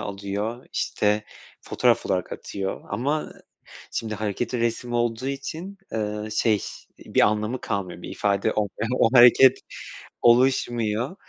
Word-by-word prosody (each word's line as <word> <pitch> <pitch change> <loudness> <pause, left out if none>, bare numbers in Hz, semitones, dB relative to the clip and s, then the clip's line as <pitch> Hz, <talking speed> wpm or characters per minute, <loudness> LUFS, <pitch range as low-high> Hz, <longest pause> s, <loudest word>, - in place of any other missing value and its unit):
alıyor, 100 +4 -4
işte, 105 0 0 0.4
fotoğraf - - +1
olarak - - -1
atıyor. 95 -1 -5
Ama 145 +5 -2 0.6
şimdi 110 -1 -3
hareketli 110 +4 -2
resim 120 +1 -2
olduğu 120 +1 -1
için, 160 +8 -5 0.2
ııı, 105 0 -3
şey, 110 -1 +2 0.4
bir - - 0
anlamı 105 +4 +1
kalmıyor, 95 -5 -4
bir - - -7
ifade 100 -1 0
olmuyor, 105 +2 -2
o 115 - +5
hareket 125 +2 +7 0.6
oluşmuyor. 120 - +2
110 Hz, 115 wpm, -24 LUFS, 105-125 Hz, 0.6 s, hareket